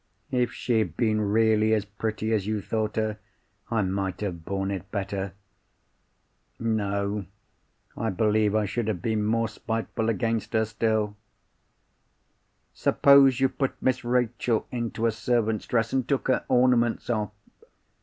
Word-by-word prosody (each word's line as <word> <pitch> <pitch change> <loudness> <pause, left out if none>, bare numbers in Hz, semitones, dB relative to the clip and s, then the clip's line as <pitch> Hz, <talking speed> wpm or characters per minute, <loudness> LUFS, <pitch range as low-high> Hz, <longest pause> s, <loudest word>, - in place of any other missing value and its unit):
"If 125 -2 +1
she 120 -3 0
had 90 -6 -2
been 110 -2 +2
really 110 +1 +3
as 105 -1 -1
pretty 110 +2 -3
as 105 -2 0
you 110 -1 0
thought 110 +1 -2
her, 110 -1 -1 0.5
I 115 -3 +1
might 95 0 -2
have 90 -5 -4
borne 95 +2 -2
it 95 -1 -5
better. 100 -1 -3 1.3
No; 100 -3 -1 0.7
I 115 +1 -1
believe 105 +1 +2
I 110 -1 +2
should 115 +2 -2
have 100 -6 -2
been 110 -2 0
more 115 +2 +1
spiteful 110 0 -3
against 115 0 -1
her 110 0 +3
still. 110 -1 -1 1.6
Suppose 140 -2 +5
you 135 - +4
put 135 0 -3
Miss 130 -1 0
Rachel 120 -1 0
into 120 -2 -2
a 115 - +3
servant's 110 -1 0
dress, 115 -2 0
and 130 -2 0
took 135 -1 0
her 130 - +2
ornaments 125 -2 +3
off? 110 -4 0
110 Hz, 145 wpm, -26 LUFS, 105-115 Hz, 1.6 s, Suppose